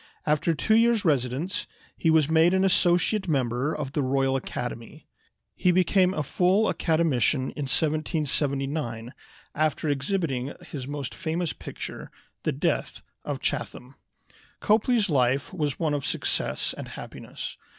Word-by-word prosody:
After 155 +2 +2
two 215 +9 +1
years' 230 -2 +3
residence 140 +4 0 0.3
he 165 - +1
was 160 -3 +4
made 160 +3 +4
an 190 - +3
associate 185 +2 +3
member 130 -1 0
of 145 -4 -4
the 150 - +1
Royal 135 0 +1
Academy. 120 -3 -5 0.5
He 180 - +2
became 185 +1 +3
a 150 - -1
full 185 +8 +2
Academician 155 -5 +1
in 145 -3 -5
1779, 140 -5 0 0.4
after 155 0 0
exhibiting 140 -2 -1 0.2
his 135 -3 -5
most 145 -2 -4
famous 170 0 -2
picture, - - -7 0.3
the - - 0
"Death - - -2 0.2
of - - -4
Chatham." 125 +2 -3 0.7
Copley's 220 0 +3
life 135 0 +1
was 150 -6 -1
one 155 -3 +1
of 145 -2 -1
success - - -1
and - - -7
happiness. - - -8
150 Hz, 130 wpm, -26 LUFS, 135-175 Hz, 0.7 s, was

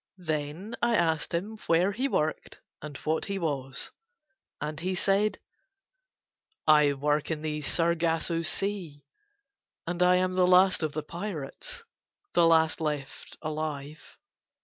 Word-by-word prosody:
Then 160 +4 -3
I 235 -1 +3
asked 160 -4 +1
him 205 +6 -3
where 175 +4 +4
he 250 +7 -1
worked 155 - -2 0.2
and 150 -3 -7
what 155 +1 0
he 200 -1 -3
was. 140 -7 -3 0.7
And 150 0 -4
he 185 +3 -1
said: 200 +3 +2 1.3
"I 150 -2 +6
work 145 +2 0
in 155 -2 -3
the 150 -1 -2
Sargasso 165 0 +1
Sea, 170 -5 -3 0.8
and 175 +1 -3
I 180 0 +6
am 185 0 +1
the 185 -1 +3
last 185 0 +5
of 155 -2 -1
the 155 - -3
pirates, 180 - -6 0.5
the 170 -1 +5
last 160 0 +3
left 150 -3 -4
alive." 155 -1 -5
165 Hz, 130 wpm, -28 LUFS, 150-185 Hz, 1.3 s, I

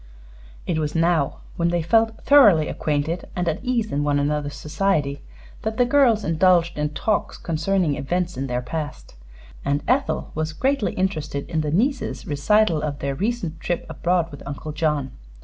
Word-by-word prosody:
It 165 -3 -1
was 150 0 -2
now, 165 -4 +1 0.2
when 170 - +1
they 170 -1 0
felt 225 +4 +2
thoroughly 210 - +6
acquainted 155 +3 -2
and 180 -1 -1
at 160 0 -1
ease 240 -4 0
in 145 +1 0
one 145 -1 +1
another's 145 0 -1
society, 150 -4 -1 0.4
that 220 0 -3
the 245 - +4
girls 245 -5 +4
indulged 170 +1 +3
in 150 0 0
talks 215 -2 -1
concerning 170 0 0
events 175 +6 -2
in 135 +1 -3
their 125 0 -2
past, 150 +3 -6 0.5
and 140 +1 0
Ethel 270 +2 0
was 155 0 -2
greatly 265 - 0
interested 155 -7 -2
in 160 -2 -1
the 150 - -2
nieces' 250 - 0
recital 170 +3 +2
of 145 -2 -3
their 140 -1 -2
recent 190 - -2
trip 175 - -2
abroad 175 -1 0
with 145 - -10
Uncle 145 +2 -5
John. 150 -3 -1
165 Hz, 165 wpm, -23 LUFS, 150-200 Hz, 0.5 s, thoroughly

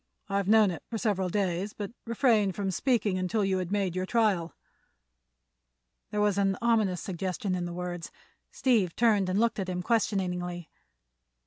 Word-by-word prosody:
I've 200 -1 0
known 215 -2 +5
it 165 - -6
for 230 - -3
several 195 -4 0
days, 190 +1 -1
but 205 0 -6 0.2
refrained 225 -5 +2
from 195 -2 -1
speaking 215 -3 +1
until 190 +3 0
you 190 -1 +1
had 180 0 -4
made 195 -4 0
your 185 0 -2
trial." 205 -8 +1 1.5
There 210 - -2
was 205 -1 +2
an 195 -1 +1
ominous 220 -7 +1
suggestion 190 0 -3
in 180 -1 -2
the 175 - -5
words. 175 -1 -5 0.4
Steve 220 -10 +1
turned 210 -5 +3
and 185 +2 +1
looked 230 -1 +1
at 190 -1 -3
him 180 0 -3
questioningly. 180 -6 -1
195 Hz, 160 wpm, -28 LUFS, 180-215 Hz, 1.5 s, known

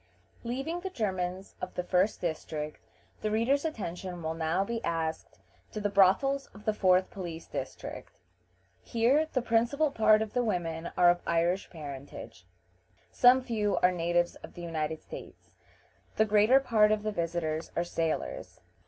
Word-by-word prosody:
Leaving 270 +8 -3
the 380 +2 -4
Germans 190 - -3
of 185 - -5
the 180 - -1
first 185 +3 +1
district, 155 -2 -4 0.4
the 215 - 0
reader's 235 +6 +2
attention 185 - -5
will 160 0 -1
now 165 +3 0
be 230 +2 -4
asked 165 -1 -3 0.3
to 215 - -4
the 205 -1 -1
brothels 205 +9 +3
of 210 - -13
the 215 - +2
fourth 185 -2 +3
police 170 -4 -6
district. - - -6 0.7
Here 260 +7 +2
the 255 - 0
principal 240 +6 +2
part 215 -2 +4
of 215 - -8
the 245 - +1
women 170 -6 -2
are 175 -1 +7
of 175 - -2
Irish 170 +3 +1
parentage; 140 - -9 0.6
some 255 +1 +6
few 215 -4 0
are 180 - +6
natives 175 0 +1
of - - -12
the 175 - -8
United 160 -2 -3
States. - - -11 0.6
The 220 - +4
greater 215 +5 +5
part 220 -5 +3
of 215 -1 +1
the 215 - -1
visitors 165 -3 -2
are 170 - +1
sailors. 165 -2 -3
190 Hz, 155 wpm, -30 LUFS, 170-230 Hz, 0.7 s, are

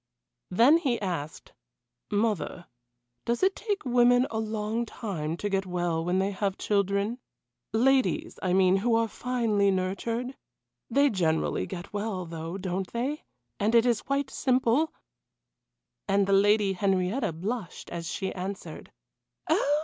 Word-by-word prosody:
Then 240 - +6
he 265 -8 0
asked: 170 -6 -5 0.6
"Mother, 205 -5 -1 0.6
does 235 +6 -1
it 385 +1 +3
take 415 -6 -3
women 245 0 +4
a 220 - -1
long 220 +1 -2
time 170 -9 -4
to 205 - -2
get 195 -1 -1
well 175 -2 -1
when 180 +2 0
they 195 +1 +1
have 195 0 -2
children? 200 +3 0 0.5
Ladies, 270 +8 +2
I 185 - 0
mean, 190 0 +4
who 225 +4 +2
are 230 0 +2
finely 225 -4 +1
nurtured? 225 +7 -2 0.5
They 280 +4 +4
generally 165 -5 0
get 185 +1 -8
well, 205 -3 -3
though, 165 +2 -6
don't 185 0 -3
they 265 +6 -3 0.3
and 215 +3 +2
it 230 0 +6
is 240 -3 +2
quite 275 0 -1
simple 260 +4 +2 0.6
" - - -59
And 200 0 +3
the 195 - +1
Lady 205 0 +4
Henrietta 195 +4 0
blushed 190 +4 -5
as 170 -1 -4
she 190 -1 -3
answered: 190 +2 -6 0.6
"Oh! 290 +1 +3
205 Hz, 140 wpm, -28 LUFS, 185-240 Hz, 0.6 s, Then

